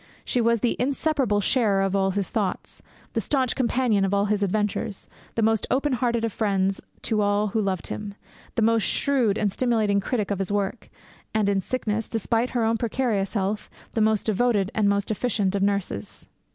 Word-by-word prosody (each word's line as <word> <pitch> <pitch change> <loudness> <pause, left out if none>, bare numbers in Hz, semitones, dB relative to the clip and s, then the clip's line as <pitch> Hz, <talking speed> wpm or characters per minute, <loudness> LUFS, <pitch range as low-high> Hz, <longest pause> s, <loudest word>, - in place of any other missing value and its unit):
She 245 - +1
was 230 -1 +2
the 240 - +1
inseparable 265 -4 +1
sharer 205 -4 +2
of 195 0 0
all 195 -1 +2
his 195 0 -2
thoughts; 205 -4 -2 0.3
the - - 0
staunch 260 -4 0
companion 245 -5 +2
of 195 +1 +1
all 200 0 +2
his 210 0 0
adventures; 205 +1 -1 0.3
the 230 - +1
most 220 -1 +2
open 275 +1 +1
hearted 235 -2 +1
of 225 - -3
friends 195 -3 0 0.2
to 215 -2 +1
all 205 +1 +2
who 220 +2 0
loved 190 -3 -1
him; 205 -1 -5 0.4
the 225 - +2
most 225 0 +3
shrewd 240 -4 +1
and 205 -2 +1
stimulating 220 -4 +1
critic 210 0 -2
of 200 - -1
his 195 0 -2
work; 205 +3 -2 0.5
and 215 -2 +2
in 200 -1 +2
sickness, 225 0 -2
despite 230 +2 0
her 240 -2 0
own 225 +1 +2
precarious 230 -4 -1
health, 205 +1 -1 0.2
the 225 - +1
most 215 -1 +2
devoted 215 -2 +1
and 210 -3 +2
most 200 +1 0
efficient 210 -3 0
of 200 - 0
nurses.' 200 - -2
215 Hz, 190 wpm, -25 LUFS, 200-235 Hz, 0.5 s, most